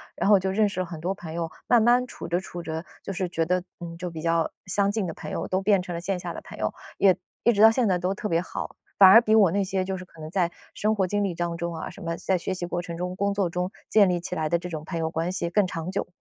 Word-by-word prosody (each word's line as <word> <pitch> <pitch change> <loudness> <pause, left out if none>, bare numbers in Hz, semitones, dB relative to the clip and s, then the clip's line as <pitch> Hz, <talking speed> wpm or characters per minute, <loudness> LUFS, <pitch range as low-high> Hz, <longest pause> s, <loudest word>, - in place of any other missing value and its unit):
然 - - 0
后 205 -2 +7
就 190 +1 -1
认 210 +2 +3
识 195 - -5
了 185 - 0
很 170 -2 -8
多 180 +3 -1
朋 175 -5 -9
友， 165 -1 -3 0.2
慢 240 -2 +5
慢 245 +2 +4
处 - - -8
着 170 +1 +1
处 175 -2 -8
着， 160 +1 -4 0.2
就 - - -5
是 185 -1 -2
觉 165 -2 -1
得， 180 +2 +1 0.2
嗯， 170 -1 -7
就 180 +1 -4
比 160 -2 -7
较 165 0 +1 0.2
相 200 +1 +1
近 210 -2 -1
的 165 - -4
朋 - - -8
友 - - -3
都 185 +1 0
变 195 -1 +3
成 180 -1 -6
了 170 - -3
线 185 +2 -2
下 - - -5
的 - - -6
朋 - - -11
友， - - -1 0.2
也 190 -2 +5 0.3
一 235 - +5
直 210 -3 +1
到 220 - +10
现 235 +2 +1
在 185 -2 +2
都 180 +2 -1
特 210 +1 -4
别 165 0 +2
好。 - - -6 0.2
反 195 - +10
而 225 +5 +9
比 220 -2 +3
我 200 -6 +6
那 200 +2 +1
些 190 0 -1
就 190 +1 -3
是 185 - -7
可 165 - -19
能 155 0 -7
在 175 -2 +1 0.2
生 215 +1 +1
活 195 -3 +2
经 205 +3 0
历 190 -4 -1
当 170 0 -2
中 170 0 -3
啊， 160 - -5
什 - - -12
么 165 0 -2
在 190 - 0
学 180 +2 -3
习 180 -1 -3
过 175 0 -2
程 170 -1 -7
中、 180 +1 -3
工 200 +1 0
作 200 -3 0
中 180 +2 -2 0.2
建 205 -3 +5
立 175 -1 +1
起 180 +1 -6
来 155 -2 -1
的 170 - +3
这 180 +1 -7
种 155 -3 -5
朋 170 - -4
友 160 0 -1
关 165 +2 -1
系 180 -2 -2
更 200 +2 +2
长 165 0 -4
久。 195 - -2
180 Hz, 335 characters per minute, -26 LUFS, 170-195 Hz, 0.3 s, 到